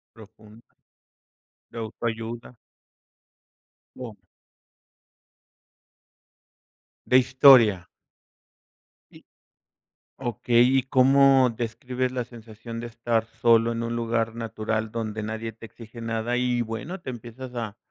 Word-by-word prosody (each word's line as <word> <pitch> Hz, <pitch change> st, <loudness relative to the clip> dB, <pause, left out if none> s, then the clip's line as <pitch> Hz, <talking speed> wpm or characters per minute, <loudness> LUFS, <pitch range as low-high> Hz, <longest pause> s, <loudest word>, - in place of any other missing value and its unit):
Profunda. 110 Hz, +1 st, -17 dB, 1.0 s
De 115 Hz, -, -9 dB
autoayuda. 115 Hz, +2 st, -5 dB, 1.4 s
No. 120 Hz, -4 st, -8 dB, 2.9 s
De 125 Hz, -, +4 dB
historia. 125 Hz, -7 st, +6 dB, 1.2 s
Sí. -, -, -18 dB, 0.9 s
Okey. 120 Hz, +1 st, +2 dB
¿Y 130 Hz, -, +2 dB
cómo 135 Hz, 0 st, +4 dB
describes 125 Hz, +2 st, -3 dB
la 125 Hz, -1 st, -2 dB
sensación 115 Hz, -1 st, -10 dB
de 120 Hz, -, -6 dB
estar 115 Hz, -1 st, -1 dB, 0.2 s
solo 115 Hz, -1 st, +4 dB
en 115 Hz, 0 st, -3 dB
un 115 Hz, 0 st, -3 dB
lugar 115 Hz, -1 st, -1 dB
natural 110 Hz, -1 st, -3 dB
donde 110 Hz, -2 st, -4 dB
nadie 110 Hz, +1 st, -5 dB
te 115 Hz, -, -12 dB
exige 115 Hz, +1 st, -12 dB
nada? 115 Hz, +1 st, -2 dB
Y 125 Hz, -1 st, 0 dB
bueno, 120 Hz, -, -6 dB
te 130 Hz, -, -7 dB
empiezas 120 Hz, +1 st, -9 dB
a 115 Hz, -2 st, -5 dB
115 Hz, 100 wpm, -25 LUFS, 110-125 Hz, 2.9 s, historia